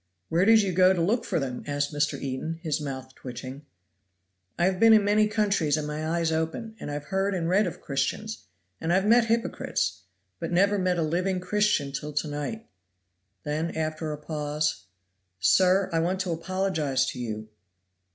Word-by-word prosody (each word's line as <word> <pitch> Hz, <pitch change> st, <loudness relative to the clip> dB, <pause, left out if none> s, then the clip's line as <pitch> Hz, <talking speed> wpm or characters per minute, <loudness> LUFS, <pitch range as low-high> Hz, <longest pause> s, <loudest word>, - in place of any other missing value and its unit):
"Where 170 Hz, +3 st, +3 dB
did 225 Hz, 0 st, +6 dB
you 195 Hz, -, 0 dB
go 185 Hz, +1 st, +5 dB
to 180 Hz, -, -2 dB
look 210 Hz, +8 st, +1 dB
for 175 Hz, -, 0 dB
them?" 130 Hz, -3 st, -4 dB
asked 145 Hz, 0 st, -1 dB
Mr. 145 Hz, 0 st, 0 dB
Eden, 140 Hz, +5 st, -4 dB
his 155 Hz, -2 st, -1 dB
mouth 130 Hz, -2 st, -6 dB
twitching. 130 Hz, +3 st, -8 dB, 0.9 s
"I 175 Hz, -, +2 dB
have 185 Hz, 0 st, +1 dB
been 225 Hz, 0 st, +7 dB
in 215 Hz, -2 st, +5 dB
many 210 Hz, +1 st, +4 dB
countries, 205 Hz, -8 st, +1 dB
and 155 Hz, -, -2 dB
my 150 Hz, +1 st, -3 dB
eyes 165 Hz, 0 st, 0 dB
open; 160 Hz, +8 st, -2 dB
and -, -, -6 dB
I've 145 Hz, 0 st, -4 dB
heard 195 Hz, +4 st, -1 dB
and 170 Hz, -2 st, -1 dB
read 190 Hz, +3 st, +3 dB
of 175 Hz, -, -7 dB
Christians, 205 Hz, +10 st, -2 dB, 0.4 s
and 165 Hz, -, -1 dB
I've 190 Hz, +2 st, +3 dB
met 230 Hz, +2 st, +5 dB
hypocrites; 220 Hz, -, -1 dB, 0.4 s
but -, -, -4 dB
never 200 Hz, +3 st, +3 dB
met 180 Hz, -1 st, +1 dB
a 165 Hz, -, +1 dB
living 180 Hz, +4 st, 0 dB
Christian 185 Hz, -6 st, +1 dB
till 150 Hz, +2 st, -5 dB
to 150 Hz, +2 st, -1 dB
night." 150 Hz, +10 st, -4 dB, 0.8 s
Then, 155 Hz, +3 st, -2 dB
after 155 Hz, 0 st, -2 dB
a 150 Hz, -, -4 dB
pause, 150 Hz, -, -2 dB, 0.5 s
"Sir, 185 Hz, -, +4 dB
I 165 Hz, -, +2 dB
want 180 Hz, +3 st, 0 dB
to 185 Hz, -2 st, -2 dB
apologize 165 Hz, -6 st, 0 dB
to -, -, -6 dB
you!" 110 Hz, -2 st, -5 dB
165 Hz, 180 wpm, -27 LUFS, 145-190 Hz, 0.9 s, been